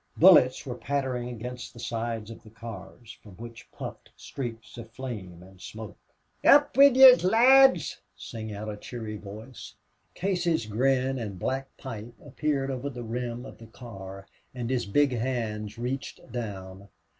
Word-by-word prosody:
Bullets 150 -8 +6
were 130 - -4
pattering 125 0 -2
against 125 0 -7
the - - -11
sides 115 -1 -4
of 115 - -11
the 110 - -15
cars, 115 +1 -10
from 105 - -14
which 115 +3 -11
puffed - - -8
streaks 115 -7 -7
of 115 - -9
flame 100 -10 -7
and 95 0 -17
smoke. 110 -2 -9 0.4
"Up 290 0 +6
wid 275 -1 +7
yez, 260 -4 +9
lads!" 240 - +5
sang 110 - -7
out 105 +1 -6
a 105 -1 -5
cheery 110 -1 -7
voice. 110 +5 -10 0.4
Casey's 175 - 0
grin 130 +4 +1
and 105 -5 -5
black 135 +7 -3
pipe 120 -2 -8
appeared 140 -1 -1
over 130 +2 -4
the 125 -3 -7
rim 120 +1 -4
of - - -12
the 115 - -12
car, 95 -5 -10 0.3
and 120 0 -3
his 125 -5 -1
big 145 +7 +3
hands 115 -3 -3
reached 125 +1 -5
down. 100 -4 -6
120 Hz, 155 wpm, -27 LUFS, 110-135 Hz, 0.4 s, yez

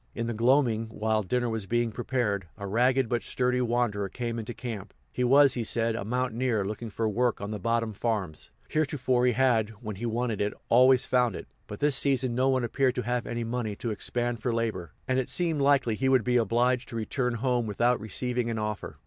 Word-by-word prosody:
In 115 - -2
the 120 - -2
gloaming, 120 -1 +2
while 110 0 -1
dinner 120 +5 -1
was 110 -4 -3
being 120 +1 0
prepared, 110 -5 -2
a 100 - -6
ragged 125 +5 +2
but 120 0 -1
sturdy 125 0 0
wanderer 115 -5 0
came 115 +2 -4
into 110 +1 -5
camp. 115 -5 -7 0.2
He 125 - -2
was, 135 +2 +6
he 120 - -2
said, 115 +1 +1
a 115 - -3
mountaineer 120 -1 -1
looking 110 +3 -5
for 110 +1 -2
work 120 +3 0
on 100 +1 -5
the 105 - -4
bottom 115 +2 0
farms; 100 -7 -3 0.2
heretofore 130 -5 +1
he 125 - +3
had, 115 -4 +2
when 105 -5 -6
he 120 +4 -3
wanted 115 -2 -1
it, 105 0 -1
always 130 +1 +5
found 125 -5 +2
it; - - -8 0.2
but 105 - -8
this 145 -1 +3
season 130 -3 +2
no 130 +2 +2
one 130 -2 +1
appeared 130 +2 +1
to 125 - -2
have 120 0 -2
any 120 0 -3
money 115 -2 -3
to 115 +2 -4
expend 120 +2 -2
for 125 - 0
labor, 110 -8 -2 0.2
and 130 0 +1
it 130 - -3
seemed 165 -5 +1
likely 140 -4 +3
he 130 +5 0
would 130 -3 +4
be 125 +2 +2
obliged 120 +3 +1
to - - -8
return 125 +2 -1
home 120 -1 0
without 120 +4 +1
receiving 120 +3 -2
an 115 - -2
offer. 105 -1 -4
120 Hz, 215 wpm, -28 LUFS, 110-125 Hz, 0.2 s, was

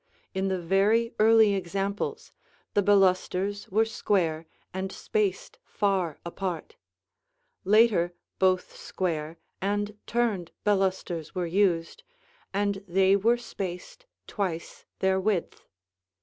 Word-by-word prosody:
In 190 0 -1
the 190 -1 0
very 200 +7 +2
early 220 -1 +6
examples, 200 - -3 0.4
the 205 - +3
balusters 195 0 +2
were 220 +4 +3
square 170 -7 0 0.3
and 190 +1 -3
spaced 200 -2 -2
far 190 -6 0
apart; 185 - -4 0.9
later 210 -4 +4 0.3
both 185 -1 +2
square 165 -3 -3 0.2
and 205 +2 -1
turned 220 -8 -1
balusters 190 -5 0
were 180 -1 -1
used, 170 -2 +1 0.5
and 200 0 -1
they 190 +2 +4
were 230 +5 +3
spaced 235 - -7 0.2
twice 180 -5 -4 0.2
their 190 0 +3
width. 190 -3 -2
195 Hz, 105 wpm, -27 LUFS, 180-205 Hz, 0.9 s, early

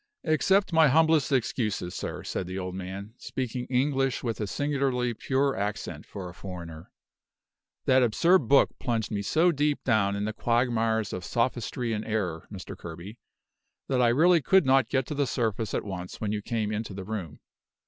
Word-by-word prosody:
"Accept 190 +4 +2
my 160 -1 +6
humblest 160 0 +4
excuses, 110 -8 -1
sir," - - -5
said 90 - -3
the 95 +1 -5
old 90 -1 -4
man, 95 +3 -6
speaking 125 -1 -4
English 135 0 +1
with 115 -3 -2
a 105 - -1
singularly 135 -1 0
pure 135 +4 0
accent 100 +1 -4
for 95 -2 -7
a 90 - -9
foreigner. 85 -4 -8 1.0
"That 130 0 +5
absurd 125 - +3
book 140 +2 +5
plunged 115 -4 -1
me 105 -2 -1
so 160 - +3
deep 150 -1 0
down 100 -5 +2
in 100 +1 -2
the 110 - -2
quagmires 115 -2 +1
of 90 - -4
sophistry 120 0 -1
and 105 0 -2
error, 95 -7 -2
Mr. 100 0 -7
Kerby, 90 +6 -9 0.7
that 130 -2 +2
I 120 - +5
really 165 +8 +5
could 190 +6 +4
not 130 -3 +4
get 130 -2 +1
to - - -5
the 140 -1 0
surface 115 -3 -1
at - - -2
once 90 -3 -6
when 105 -2 -2
you 105 -1 -2
came 110 -1 -2
into 110 -2 -4
the 95 - -5
room. 95 -7 -5
115 Hz, 180 wpm, -27 LUFS, 100-135 Hz, 1.0 s, my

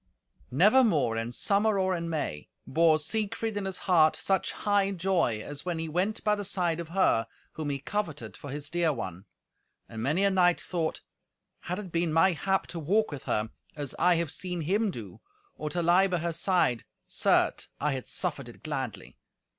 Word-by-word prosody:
Nevermore, 175 - +4
in 115 +1 -2
summer 205 - +2
or 190 -1 +1
in 170 -1 -3
May, 145 - -3 0.2
bore 160 +2 +4
Siegfried 215 +6 -2
in 205 -1 -2
his 190 -1 -3
heart 160 -4 +5
such 195 -1 0
high 205 -1 +1
joy, 175 - 0
as 145 0 -7
when 175 -2 -2
he 165 0 -3
went 185 +7 -1
by 210 - +3
the 205 -1 -2
side 175 -4 -1
of 170 -2 -6
her 165 -11 +2 0.2
whom 155 -2 -4
he 140 - -1
coveted 155 +1 -4
for 145 - -9
his 145 +1 -3
dear 170 0 +1
one. 95 - -6 0.6
And 110 - -7
many 150 - +1
a 200 - +4
knight 175 -2 +4
thought, 165 -3 -2 0.6
"Had 180 +1 -4
it 200 -4 -7
been 170 -1 0
my 165 +4 +5
hap 190 +3 0
to 170 - -4
walk 200 +8 +1
with 145 -3 -7
her, 110 +1 -1 0.2
as 145 -3 -4
I 180 -1 +5
have 165 -3 -1
seen 180 -2 -3
him 200 +7 +1
do, 115 - -8 0.3
or 155 - -4
to 175 +2 -1
lie 180 +3 +5
by 180 -2 0
her 170 0 -2
side, 165 - +2 0.2
certes, - - +2
I 150 +1 +1
had 130 -2 -4
suffered 145 -9 -2
it 120 - -15
gladly! 130 -10 -5
170 Hz, 190 wpm, -28 LUFS, 145-190 Hz, 0.6 s, heart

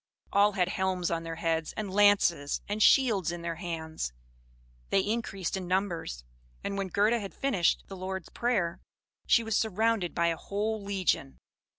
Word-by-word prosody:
All 205 +1 +5
had 185 -2 +1
helms 185 -2 -1
on 165 -1 0
their 165 0 -5
heads, 165 -1 -1
and 205 -3 -3
lances 195 -8 +4
and 210 +1 -2
shields 215 - +4
in 175 -1 -6
their 170 -1 -3
hands; 160 - -4 0.8
they 195 - +3
increased 205 -4 -2
in 185 -2 -4
numbers; 180 - -1 0.4
and 200 - -3
when 195 -1 -2
Gerda 210 +6 +2
had 200 -2 -7
finished 220 -11 +1
the 195 - -9
Lord's 190 -1 -5
Prayer, 205 -9 0 0.5
she 235 - +5
was 225 -1 -1
surrounded 220 -3 +1
by 170 0 +2
a 165 - -1
whole 210 +5 -2
legion. 190 -8 -1
190 Hz, 165 wpm, -29 LUFS, 170-205 Hz, 0.8 s, All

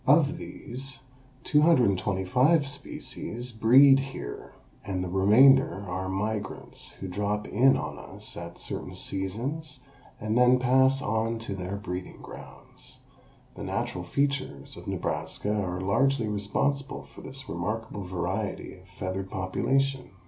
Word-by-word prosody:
Of 150 +2 +5
these 130 -1 -6 0.4
225 130 - +3
species 125 -3 -6
breed 130 +5 +7
here 135 - -6 0.3
and 95 -3 -2
the 90 - -4
remainder 100 +1 +5
are 95 +1 -3
migrants 105 +1 -4
who 95 - -7
drop 105 +2 -2
in 130 +6 +4
on - - -5
us - - -8
at - - -7
certain - - -5
seasons 130 +10 -4 0.4
and 110 +1 -1
then 125 +1 +6
pass 130 +2 +4
on 110 +1 0
to 100 - -3
their 95 0 -4
breeding 90 -2 -6
grounds. - - -11 0.5
The - - -10
natural 90 - -2
features 130 - -2
of - - -11
Nebraska 105 - -2
are 90 -4 -1
largely 115 +6 +2
responsible 105 +7 -1
for - - -14
this 135 0 -7
remarkable 105 +3 -3
variety 90 -1 -3
of - - -17
feathered 95 +1 -4
population. 135 +9 0
110 Hz, 125 wpm, -28 LUFS, 95-135 Hz, 0.5 s, breed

